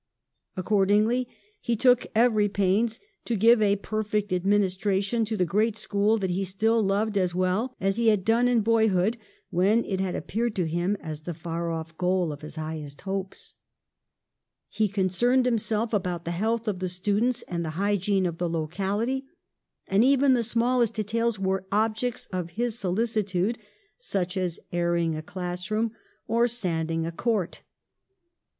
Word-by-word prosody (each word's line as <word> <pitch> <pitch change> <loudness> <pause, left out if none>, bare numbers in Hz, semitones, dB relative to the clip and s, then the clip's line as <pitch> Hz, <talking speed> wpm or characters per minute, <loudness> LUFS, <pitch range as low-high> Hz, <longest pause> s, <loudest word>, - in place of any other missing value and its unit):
Accordingly 210 +5 +2 0.3
he 235 - -1
took 245 +2 +4
every 220 -3 +4
pains 205 +4 +1 0.3
to 235 - -1
give 225 +2 +5
a 200 -1 +4
perfect 210 -1 -2
administration 195 +3 +1
to 220 0 -3
the 180 - +2
great 210 +5 +1
school 215 +1 +1
that 190 -4 -1
he 190 +2 0
still 220 +5 +1
loved 205 +1 +1
as 180 -2 0
well 185 +8 0
as 195 +2 0
he 235 -1 +2
had 210 -4 +3
done 230 +2 +3
in 245 -2 +3
boyhood, 220 -1 +2 0.3
when 195 +6 +3
it 190 -2 -2
had 190 -1 -1
appeared 230 +2 -2
to 180 - 0
him 175 +5 0
as 155 -3 -6
the 165 +2 -6
far 170 +1 -4
off 160 0 -5
goal 180 -2 +1
of 145 - -8
his 155 0 -9
highest 155 -2 -6
hopes. 195 0 -5 1.2
He 215 0 0
con 190 -1 +1
cerned 245 +7 +2
himself 225 -1 0
about 180 -4 -1
the 170 - -2
health 220 +6 -1
of 200 -4 -1
the 185 -1 -2
stu 195 +3 0
dents 245 +1 0
and 170 -1 -3
the 160 - -3
hygiene 200 -1 +1
of 170 -2 -3
the 175 -1 0
locality, 200 - -2 0.6
and 195 +3 +3
even 270 +1 +4
the 245 - +3
smallest 235 0 +1
details 225 +1 0
were 190 0 -1
objects 220 +3 0
of 180 -2 -2
his 240 -1 0
solici 220 +2 0
tude, 195 +5 -1 0.4
such 190 - -2
as 180 -3 -2
airing 170 -1 +1
a 155 - -4
classroom 185 +6 -3 0.4
or 235 +1 +3
sanding 165 -8 -1
a 165 - -3
58 - - -22
PASTEUR - - -9
court. 210 -7 0
200 Hz, 170 wpm, -26 LUFS, 180-225 Hz, 1.2 s, give